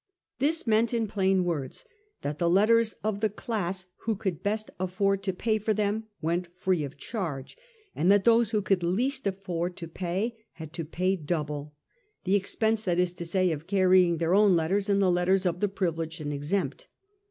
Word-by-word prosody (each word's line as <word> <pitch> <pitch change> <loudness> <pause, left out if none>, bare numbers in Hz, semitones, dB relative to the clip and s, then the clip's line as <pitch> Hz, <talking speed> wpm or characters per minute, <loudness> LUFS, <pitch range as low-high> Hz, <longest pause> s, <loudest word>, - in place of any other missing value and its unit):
This 305 +5 +2
meant, 225 +1 +2
in 230 -1 +1
plain 190 -2 +2
words, 150 -7 -3 0.4
that 145 +1 -3
the 170 - +2
letters 220 +4 +4
of 215 -1 -1
the 215 0 +1
class 195 -4 -3
who 225 -1 -2
could 190 -5 -3
best 215 +1 -2
afford 195 +2 0
to 195 -1 -1
pay 215 +4 0
for 215 +1 0
them 210 +2 0 0.2
went 170 +2 -1
free 185 -3 0
of 140 0 -7
charge, 165 - -5 0.4
and 175 +5 +3
that 200 -1 +4
those 230 -1 +5
who 215 -3 0
could 190 -1 +2
least 235 +9 0
afford 180 -2 -3
to 165 - -6
pay 190 +7 -3
had 160 -1 -10
to 165 -1 -4
pay 185 +4 0
double 150 -3 -4 0.2
— 425 -3 -44
the 190 - 0
expense, 220 +2 +1
that 180 -5 0
is 180 -1 +1
to 170 -1 -7
say, 185 0 +2
of 155 +1 -5
carrying 185 -3 +4
their 165 +2 +1
own 200 -2 +5
letters 190 +5 0
and 200 0 +3
the 185 - +4
letters 185 +2 +2
of 175 -1 0
the 205 - +1
privileged 165 -4 -2
and 150 -1 -3
exempt. 145 +1 -2
190 Hz, 195 wpm, -28 LUFS, 170-210 Hz, 0.4 s, those